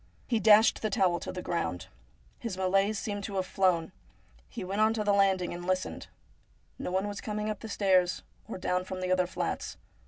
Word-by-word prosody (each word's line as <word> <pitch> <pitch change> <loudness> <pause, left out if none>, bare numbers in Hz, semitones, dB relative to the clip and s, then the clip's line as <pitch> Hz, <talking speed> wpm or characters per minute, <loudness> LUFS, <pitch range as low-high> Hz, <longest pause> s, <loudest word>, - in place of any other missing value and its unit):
He 230 -3 +1
dashed 215 +2 +6
the 215 - 0
towel 180 -3 +2
to - - -5
the 180 - -6
ground. 90 - -2 0.5
His 220 -6 -4
malaise 195 +3 +2
seemed 205 0 -4
to 200 - -6
have 190 -1 0
flown. 180 -3 +1 0.6
He - - -6
went 195 +3 -1
on 220 +1 +4
to 215 - -1
the 205 -1 +2
landing 190 -3 +2
and 175 0 -7
listened. 185 +1 -2 0.7
No - - -3
one 190 +2 0
was 205 0 -5
coming 210 0 -2
up 210 - -6
the 225 - -8
stairs, 185 -3 +2 0.2
or 225 - -5
down 180 0 -1
from 185 0 -6
the 185 0 -1
other 185 -1 +2
flats. - - -3
190 Hz, 200 wpm, -29 LUFS, 185-210 Hz, 0.7 s, dashed